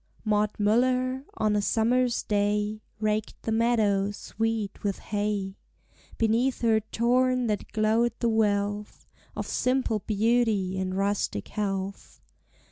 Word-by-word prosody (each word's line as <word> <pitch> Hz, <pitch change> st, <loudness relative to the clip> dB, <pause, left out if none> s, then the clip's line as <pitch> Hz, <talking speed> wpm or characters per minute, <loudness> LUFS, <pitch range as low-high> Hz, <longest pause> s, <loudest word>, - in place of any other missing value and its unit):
Maud 210 Hz, 0 st, +2 dB
Muller, 255 Hz, +5 st, +1 dB
on 215 Hz, -1 st, +1 dB
a 205 Hz, -, +2 dB
summer's 240 Hz, +3 st, +1 dB
day, 210 Hz, +1 st, 0 dB, 0.2 s
Raked 215 Hz, 0 st, -1 dB
the 225 Hz, -, -2 dB
meadow 220 Hz, -4 st, +2 dB
sweet 220 Hz, 0 st, -3 dB
with 200 Hz, -2 st, -1 dB
hay. 205 Hz, -2 st, -2 dB, 0.6 s
Beneath 230 Hz, +4 st, +1 dB
her 225 Hz, -2 st, +4 dB
torn 250 Hz, +3 st, +1 dB
hat 210 Hz, -2 st, -2 dB
glowed 220 Hz, +2 st, +2 dB
the 235 Hz, -, +1 dB
wealth 205 Hz, -2 st, 0 dB, 0.3 s
Of -, -, -3 dB
simple 250 Hz, -4 st, 0 dB
beauty 215 Hz, -2 st, +1 dB
and 185 Hz, 0 st, -2 dB
rustic 200 Hz, -, -1 dB
health. 195 Hz, -2 st, -4 dB
215 Hz, 120 wpm, -27 LUFS, 205-235 Hz, 0.6 s, her